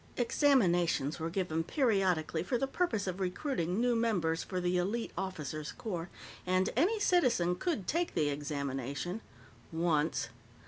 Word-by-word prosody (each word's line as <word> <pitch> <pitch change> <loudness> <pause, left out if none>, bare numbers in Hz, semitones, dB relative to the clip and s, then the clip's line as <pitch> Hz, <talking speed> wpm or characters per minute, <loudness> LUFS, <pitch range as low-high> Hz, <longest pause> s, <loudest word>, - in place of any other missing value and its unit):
Examinations 180 - +2
were 160 +1 -2
given 165 -3 -1
periodically 190 - +1
for 245 +8 0
the 270 - 0
purpose 270 - 0
of 185 0 -3
recruiting 185 - -1
new 245 0 +2
members 180 -9 +1
for 185 - -3
the 180 0 0
elite 205 +6 -1
officers' 155 -5 -4
corps, 175 -5 -4 0.3
and 185 +1 +1
any 375 - +3
citizen 250 - +3
could 225 - -2
take 340 - -1
the 150 -3 +2
examination 140 - -3 0.5
once. 160 -7 +1
180 Hz, 135 wpm, -32 LUFS, 160-230 Hz, 0.5 s, any